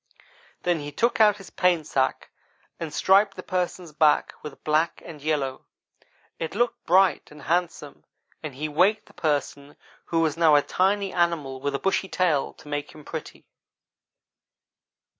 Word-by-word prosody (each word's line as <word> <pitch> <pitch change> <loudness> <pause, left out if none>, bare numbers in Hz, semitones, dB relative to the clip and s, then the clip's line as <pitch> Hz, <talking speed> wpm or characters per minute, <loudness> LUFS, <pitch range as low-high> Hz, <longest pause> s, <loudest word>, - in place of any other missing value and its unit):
Then 175 -2 +1
he 145 0 -6
took 235 +6 +1
out 210 -1 +5
his 195 -2 -13
paint 175 -4 +2
sack 135 -3 -1 0.5
and 165 -2 -5
striped 195 +4 +3
the 185 - -8
Person's 180 -2 -3
back 150 0 +3
with 150 -2 -10
black 155 +2 +1
and 155 -4 -10
yellow. 145 -3 -2 0.7
It 165 +3 -4
looked 240 +2 -1
bright 190 +2 +3
and 150 0 -14
handsome 165 -4 -2 0.4
and 150 -4 -7
he 150 +3 -3
waked 185 +8 +2
the - - -20
Person, 145 -1 -2 0.3
who 165 -1 0
was 160 -2 +1
now 160 -3 +5
a 145 - +4
tiny 195 +1 0
animal 160 -7 0
with 140 0 -1
a - - -2
bushy 195 0 0
tail 165 -7 +1
to - - -17
make 145 0 -4
him 150 -1 -13
pretty. - - -8
160 Hz, 160 wpm, -25 LUFS, 145-185 Hz, 0.7 s, out